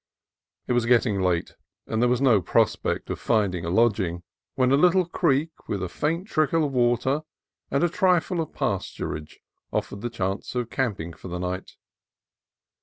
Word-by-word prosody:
It - - 0
was 120 -1 +1
getting 115 -5 +3
late, 90 -2 0 0.3
and 110 - -1
there 125 - +4
was 125 +1 +1
no 120 -8 +5
prospect - - 0
of - - -4
rinding 100 -7 +2
a - - -2
lodging, 95 -4 +1 0.3
when 130 -1 +2
a - - +6
little 180 +4 +4
creek 160 -2 0
with 100 -3 -2
a 90 - -3
faint 165 - -2
trickle 155 -3 +2
of 145 - -2
water 125 +3 +2 0.5
and 140 +4 +1
a - - +5
trifle 180 0 +2
of 160 - -5
pasturage 75 0 -3 0.3
offered 100 - -3
the 120 - -2
chance 95 0 -3
of 120 -2 -2
camping 100 -11 -2
for 95 - -11
the 90 0 -4
night. 90 +1 -4
120 Hz, 170 wpm, -25 LUFS, 95-145 Hz, 0.5 s, a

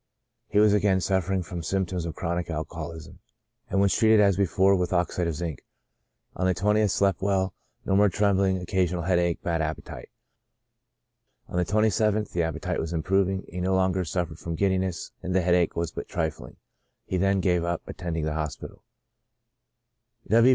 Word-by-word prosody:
He - - -2
was 105 0 +6
again 100 -2 +3
suffer 95 +1 0
ing 95 -1 0
from 85 0 -6
symptoms 90 0 -2
of 80 - -6
chronic 85 0 -2
alcoholism, 80 0 -6 0.5
and 95 - +1
was 100 -2 +3
treated 110 -1 +4
•Il8 - - +6
CHRONIC 105 -1 +6
ALCOHOLISM. 100 +2 +1
as - - +1
before 95 +2 +4
with 90 -1 -1
oxide 90 0 0
of 80 - -2
zinc. 80 -3 -5 0.7
On 95 +1 0
the 90 - +2
20th, 105 +1 +2
slept 95 -1 +1
well, 95 -1 +1 0.3
no 95 - +1
more 100 +1 +5
trembling, 95 -1 +2
occasional 90 -1 -1
headache; 85 -1 +1
bad 85 -1 0
appetite. 80 0 -5 1.4
On - - -8
the 90 - +2
27th, 110 +1 +1
the 85 - 0
appetite 80 +2 -2
was 80 +1 -3
improving; 95 +3 0
he 90 +1 -6
no 95 +1 +1
longer 95 0 +1
suffered 85 -2 -3
from 85 -1 -4
giddiness, 95 -1 -1
and 90 0 -3
the 95 - +4
headache 90 -1 +2
was 85 0 -2
but - - -6
trifling. 80 -1 -3 0.5
He 95 - -2
then 95 +1 +2
gave 90 -2 +1
up 85 -1 -2
attending 80 -3 -4
the 80 - -1
hospital. 75 -1 -5
90 Hz, 175 wpm, -26 LUFS, 85-95 Hz, 1.4 s, was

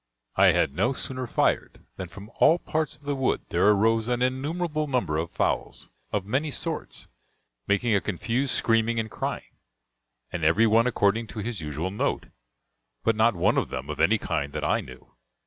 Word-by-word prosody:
I - - +6
had 70 - +3
no 120 - +1
sooner 130 -1 -5
fired - - 0
than 95 - -5
from 100 +5 -12
all 165 - +5
parts 160 -3 -2
of - - -25
the 145 0 -1
wood 135 -1 0
there 90 +4 +2
arose 110 +2 +3
an 125 0 0
innumerable 150 +4 -1
number 125 - 0
of 85 +1 -2
fowls, - - -2 0.2
of 100 -2 -1
many 135 +9 0
sorts, 160 +2 -4 0.6
making 110 +3 +2
a 100 - +3
confused 120 +7 -1
screaming 115 0 +2
and 110 -1 -3
crying, - - -4 0.8
and 85 -3 -4
every 85 +9 +4
one 115 +2 +4
according 110 -1 +1
to 110 - -8
his 110 -3 -4
usual 75 +4 -3
note, 100 - -1 0.8
but 115 - +2
not 110 0 +3
one 85 - +2
of - - -3
them - - -5
of - - -7
any - - +4
kind 70 0 -3
that - - -4
I - - +2
knew. 65 0 -14
115 Hz, 180 wpm, -26 LUFS, 100-130 Hz, 0.8 s, I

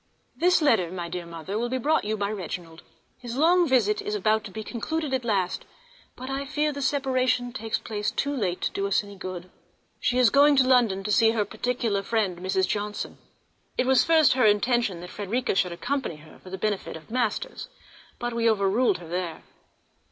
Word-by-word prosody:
This 355 -1 +3
letter, 200 - +3
my 175 -2 -5
dear 175 0 -5
Mother, 170 +5 -5
will 240 +1 -1
be 260 - -1
brought 295 0 +1
you 215 +1 -1
by 200 0 -1
Reginald. 170 -4 -6 0.4
His 245 0 -6
long 345 +3 +4
visit 215 -6 +2
is 210 - -3
about 215 +2 +1
to 200 - -8
be 220 +2 -6
concluded 295 +6 -3
at 260 -1 0
last, 195 -6 0 0.5
but 255 - -8
I 270 +1 -2
fear 300 +2 0
the 285 -1 -6
separation 255 -3 +1
takes 225 -3 -2
place 210 -2 -3
too 285 +5 -2
late 185 -8 -2
to - - 0
do 200 0 -2
us 200 - +2
any 200 0 -11
good. 185 -2 -7 0.5
She 250 - 0
is 250 -4 +5
going 285 +1 +6
to 260 -2 +4
London 230 -7 +3
to 210 - -2
see 225 +1 +4
her 215 -3 +1
particular 220 -1 -1
friend, 200 -4 -1
Mrs. 190 +1 0
Johnson. 210 0 -3 0.6
It 250 - +2
was 260 -1 +5
at - - -2
first 320 -3 +5
her 255 -2 +3
intention 210 -3 +2
that 180 - -9
Frederica 220 +5 -1
should 185 -2 +1
accompany 245 - -3
her, 150 +1 -16
for 185 - -13
the 190 - -5
benefit 205 -4 -2
of 160 - -16
masters, 255 - -2 0.5
but 240 0 -3
we 230 0 +2
overruled 210 +3 +2
her 175 -2 -11
there. 175 -1 -4
220 Hz, 205 wpm, -26 LUFS, 190-255 Hz, 0.6 s, going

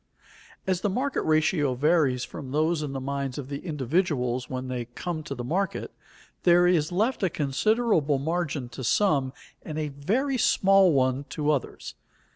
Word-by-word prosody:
As 185 -2 0
the 205 - +1
market 265 +8 -1
ratio 155 -3 +2
varies 140 -3 +2
from 135 - -8
those 155 +3 +1
in 150 -2 -4
the 135 - -4
minds 135 -1 -3
of 140 -2 -6
the 140 -1 -4
individuals 140 -5 -1
when 130 0 -4
they 125 -2 -3
come 170 -3 -4
to 140 -2 -6
the 120 - -5
market, 190 +9 -2 0.5
there 175 0 +5
is 175 -2 +2
left 220 +9 0
a 190 - +2
considerable 155 - +1
margin 150 -2 -2
to 130 - -8
some 140 - +2 0.3
and 155 -2 -7
a 155 -1 -2
very 235 - -1
small 195 -3 +4
one 130 0 +1
to 150 0 -1
others. 140 -4 -3
150 Hz, 165 wpm, -26 LUFS, 135-180 Hz, 0.5 s, there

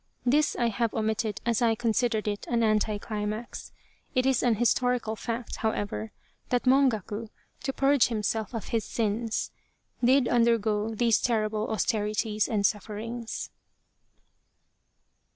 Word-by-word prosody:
This 290 +4 +3
I 235 -1 +1
have 230 +1 -1
omitted 220 -1 -1
as 235 0 +1
I 230 -2 +3
considered 230 -1 0
it 205 -1 -3
an 235 -1 +2
anti 215 -1 +2
climax. 215 +2 -5 0.4
It 255 0 +2
is 265 -2 +3
an 240 -3 +3
historical 240 0 +1
fact, 230 +2 -4
however, 220 0 -2 0.4
that 245 -1 +1
Mongaku, 230 -5 +2 0.3
to 270 - -1
purge 275 -1 +3
himself 220 0 -2
of 225 - -5
his 225 -2 0
sins, 225 0 -2 0.5
did 255 +1 +5
undergo 225 -2 +2
these 230 0 +3
terrible 215 -2 0
austerities 215 0 0
and 205 -3 0
sufferings. 225 +3 -3
225 Hz, 125 wpm, -28 LUFS, 215-240 Hz, 0.5 s, did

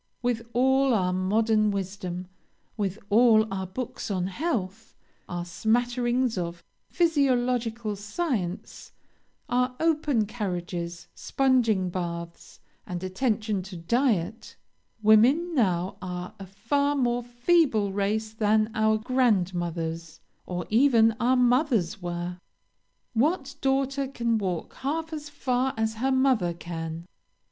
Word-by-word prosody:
With 235 -1 -1
all 265 +1 +3
our 180 -3 +1
modern 215 +3 +2
wisdom, 190 -2 -4 0.5
with 200 -2 -2
all 220 0 +6
our 190 -1 -3
books 240 +5 -5
on 185 -3 -1
health, 220 - -3 0.3
our 175 0 -4
smatterings 240 +5 0
of 170 0 -5 0.3
physiological 245 - +1
science, 205 - -4 0.5
our 250 +1 0
open 300 -8 +2
carriages, 180 -5 -4
sponging 230 -9 +1
baths, 170 -1 -6 0.3
and 180 0 -5
attention 215 0 -1
to 185 0 -9
diet, 220 +1 0 0.5
women 255 +12 +5
now 185 - +1
are 180 -1 -5
a 195 - -8
far 280 +9 0
more 245 -3 +1
feeble 240 - +2
race 215 +2 -1
than 215 0 +2
our 220 0 +2
grandmothers, 175 -9 -1 0.3
or 180 -1 -3
even 225 -2 +5
our 250 +2 +3
mothers, 245 - +2
were. 175 0 -4 0.8
What 280 +3 +1
daughter 270 0 0
can 235 -4 0
walk 185 -5 -3
half 320 +4 -3
as 300 -1 -6
far 260 -2 -1
as 220 0 0
her 265 +1 +2
mother 260 -10 +2
can? 165 0 -6
220 Hz, 115 wpm, -26 LUFS, 185-255 Hz, 0.8 s, all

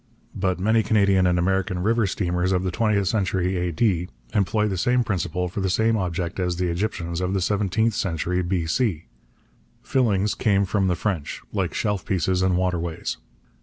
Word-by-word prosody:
But 95 -2 -1
many 110 +4 +3
Canadian 100 -4 +3
and 90 0 +2
American 95 0 0
river 115 0 +2
steamers 90 -1 -1
of 90 -1 +1
the 95 - -1
twentieth 105 -1 +1
century 95 -3 0
A.D. 90 +1 0 0.2
employ 105 +2 +1
the 100 - -2
same 125 +7 +2
principle 90 -3 -2
for 90 +3 -4
the 95 - 0
same 110 +4 +2
object 90 -3 -2
as 90 -1 0
the 90 0 -1
Egyptians 85 -1 -2
of 90 +1 -1
the - - +2
seventeenth 105 +4 +1
century 90 -1 -1
B.C. 85 +1 -1 0.8
Fillings 105 -6 +1
came 100 -2 +2
from 95 0 +1
the 90 - +1
French, 90 -6 -3
like 95 -6 -1
shelf 105 -4 -1
pieces 95 -2 0
and 95 -1 +2
waterways. 85 -8 -2
95 Hz, 165 wpm, -24 LUFS, 90-105 Hz, 0.8 s, many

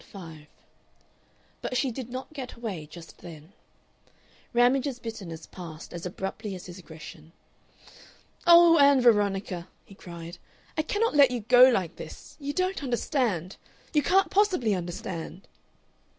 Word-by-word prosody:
Part 180 -5 -11
5 150 - -19 1.1
But 255 - -2
she 265 0 +1
did 250 0 -7
not 255 +4 -7
get 265 -4 -6
away 200 -10 -6
just 165 +1 -13
then. 160 +1 -12 1.0
Ramage's 250 +2 +2
bitterness 195 -9 -7
passed 165 -4 -10
as 175 +1 -5
abruptly 195 +3 -5
as 180 - -10
his 175 0 -10
aggression. 160 -1 -12 1.1
"Oh, 340 -1 +8
Ann 280 -1 +6
Veronica!" 200 -6 +2 0.2
he - - -15
cried, 170 -2 -10 0.4
"I - - +1
cannot 420 +8 0
let 285 -3 +7
you 245 -2 -3
go 250 +4 +7
like 190 -9 -1
this! - - -10
You 285 -1 -3
don't 370 +4 -1
understand. 240 - -1 0.4
You 300 - +4
can't 380 +5 +2
possibly 370 - +2
understand!" 175 0 -5
220 Hz, 135 wpm, -27 LUFS, 175-270 Hz, 1.1 s, Oh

